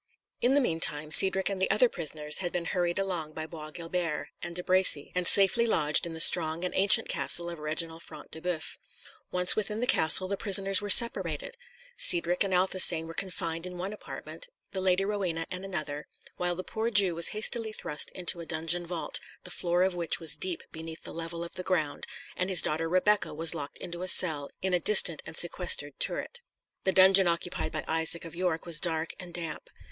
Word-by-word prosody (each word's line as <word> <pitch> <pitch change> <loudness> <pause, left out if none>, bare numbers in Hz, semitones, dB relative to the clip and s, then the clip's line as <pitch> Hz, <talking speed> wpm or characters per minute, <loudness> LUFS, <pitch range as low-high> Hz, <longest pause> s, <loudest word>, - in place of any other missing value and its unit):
In 255 +3 +2
the 285 - +3
meantime 155 - -1
Cedric 190 +3 +6
and 195 -2 -3
the 190 - 0
other 245 +4 +3
prisoners 150 -6 -2
had 175 -2 -3
been 175 -1 -4
hurried 175 -1 -2
along 175 -6 -3
by 155 0 -6
Bois 155 -1 -10
Guilbert 165 -1 -5
and 170 -1 -7
De 180 - -2
Bracy, 185 -6 +4
and 180 -1 0
safely 200 +4 +4
lodged 150 -5 +1
in 165 - -8
the - - -7
strong 165 0 +4
and 180 - -4
ancient 195 0 +4
castle 175 0 -3
of 170 - -9
Reginald 160 +2 -2
Front 155 -3 -12
de 160 - -11
Boeuf. 175 -3 -5 0.5
Once 180 0 +2
within 215 0 -3
the 245 - -1
castle, 185 -6 +4
the 200 +1 -4
prisoners 195 -2 +2
were 205 - -6
separated. - - +5 0.4
Cedric 350 - +1
and 195 - -4
Athelstane 180 -3 +5
were 165 - -9
confined 165 -2 -4
in 180 0 -9
one 190 +4 -5
apartment, - - -10 0.2
the 190 - -4
Lady 185 +1 +1
Rowena 185 -5 -3
in 185 +1 -5
another, 155 -6 -5 0.3
while 175 0 -3
the 185 - -6
poor 220 +4 -4
Jew 200 -5 +3
was 170 0 +4
hastily 220 +1 0
thrust 150 -8 -4
into 175 -1 -5
a 170 - -8
dungeon 165 +2 -2
vault, 170 -1 -1 0.2
the 180 - -11
floor 175 0 -1
of 190 0 0
which 170 -2 -2
was 160 -2 +1
deep 175 +2 -2
beneath 160 0 -9
the - - -10
level 165 +1 -6
of 170 - -9
the 185 - -5
ground, 160 -6 -3 0.3
and 185 +1 -3
his 185 -3 +4
daughter 165 +2 -2
Rebecca 185 +1 +1
was 165 +1 +1
locked 145 0 -7
into 175 0 -8
a 185 - -5
cell 155 -6 +2
in 190 -1 -1
a 180 - +2
distant 175 -3 +4
and 160 - -6
sequestered 170 -5 -1
turret. 480 - -4 0.4
The 190 - +2
dungeon 190 0 +5
occupied 170 +1 -3
by - - -5
Isaac 160 +1 -1
of 165 - -10
York 175 -2 -3
was 165 -3 +2
dark 160 -1 -2
and 180 -1 -7
damp. 165 -3 -6
175 Hz, 205 wpm, -27 LUFS, 160-190 Hz, 0.5 s, Cedric